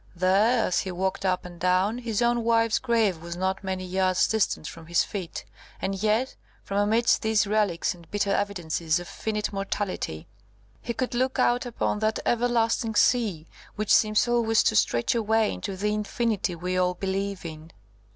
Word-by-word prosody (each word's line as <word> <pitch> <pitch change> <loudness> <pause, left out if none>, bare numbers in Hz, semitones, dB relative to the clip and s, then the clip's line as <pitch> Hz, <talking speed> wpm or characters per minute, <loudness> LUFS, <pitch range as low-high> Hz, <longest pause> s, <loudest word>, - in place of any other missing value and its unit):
There, 195 +7 +3
as 180 - +1
he 190 - -3
walked 190 +2 -2
up 180 -1 0
and 175 -1 -10
down, 185 +6 +1
his 235 -2 -1
own 240 0 +2
wife's 230 -1 +2
grave 225 -9 +1
was 170 0 -6
not 190 +1 -1
many 190 -1 -3
yards 185 0 +2
distant 220 -7 0
from 165 -1 -10
his 170 -1 +2
feet; 190 -5 -6 0.3
and 195 - -2
yet, 220 +5 +1 0.3
from 200 0 -2
amidst 220 +3 +3
these 220 -2 +2
relics 205 -5 0
and 170 -2 -17
bitter 205 -1 0
evidences 175 -5 -1
of 175 - -8
finite 210 -1 -3
mortality, 195 - -3 0.5
he 235 - -4
could 255 +1 -2
look 255 +2 0
out 245 +1 +2
upon 225 -3 -1
that 220 0 0
everlasting 230 -2 +1
sea, 205 -10 +2 0.3
which 215 0 +1
seems 215 +1 +4
always 230 -2 +3
to 220 - +2
stretch 120 - +2
away 220 -1 +1
into 195 -3 -5
the 210 +2 0
infinity 210 -3 -1
we 180 +2 -2
all 180 0 +1
believe 195 0 -3
in. 155 0 -8
205 Hz, 170 wpm, -26 LUFS, 185-225 Hz, 0.5 s, seems